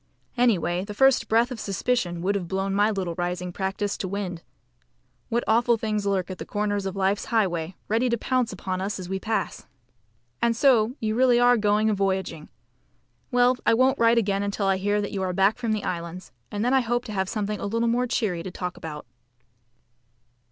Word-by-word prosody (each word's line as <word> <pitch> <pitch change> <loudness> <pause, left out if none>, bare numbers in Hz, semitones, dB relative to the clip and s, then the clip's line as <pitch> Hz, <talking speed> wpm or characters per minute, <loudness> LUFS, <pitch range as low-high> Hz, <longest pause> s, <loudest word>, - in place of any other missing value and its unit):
Anyway, 185 -8 +2
the 205 +1 -7
first 270 +2 +4
breath 230 +3 +3
of 245 - -5
suspicion 190 -4 -1
would 200 +2 +1
have 195 -4 -3
blown 195 +2 -1
my 205 +2 +3
little 190 -5 -2
rising 180 0 -3
practice 195 +2 -2
to 190 - -4
wind. 185 -3 -4 0.9
What 235 0 0
awful 235 +1 +3
things 215 -2 -2
lurk 190 -2 0
at 185 - -7
the - - -4
corners 205 -1 -1
of 190 - -5
Life's 195 +1 0
highway, 185 -6 0
ready 230 +4 +1
to 235 - +1
pounce 255 +1 0
upon 185 -1 -4
us 200 +2 -2
as 185 -2 -7
we 190 0 -2
pass! 220 +2 -3 0.7
And 235 -1 +2
so 245 -2 +3
you 215 -1 -1
really 245 0 +4
are 245 0 +6
going 210 -1 +2
a 215 - +3
voyaging! 190 -5 -2 0.8
Well, 245 0 +3
I - - +4
won't 260 +3 +3
write 230 0 +4
again 200 -3 +1
until 200 0 -2
I 195 -1 +2
hear 205 +2 0
that 205 - -4
you 195 - -3
are 185 -1 -1
back 195 +5 +2
from 235 -3 -1
the 215 -1 -1
Islands, 170 +1 -5 0.2
and 210 +2 -2
then 250 - +2
I 265 - +5
hope 240 +1 -1
to 215 - -6
have 190 -1 -1
something 210 -1 -2
a - - -3
little 230 +3 0
more 245 +2 +1
cheery 205 -8 -1
to 185 - -6
talk 180 0 -5
about. 150 -2 -7
205 Hz, 205 wpm, -25 LUFS, 190-230 Hz, 0.9 s, are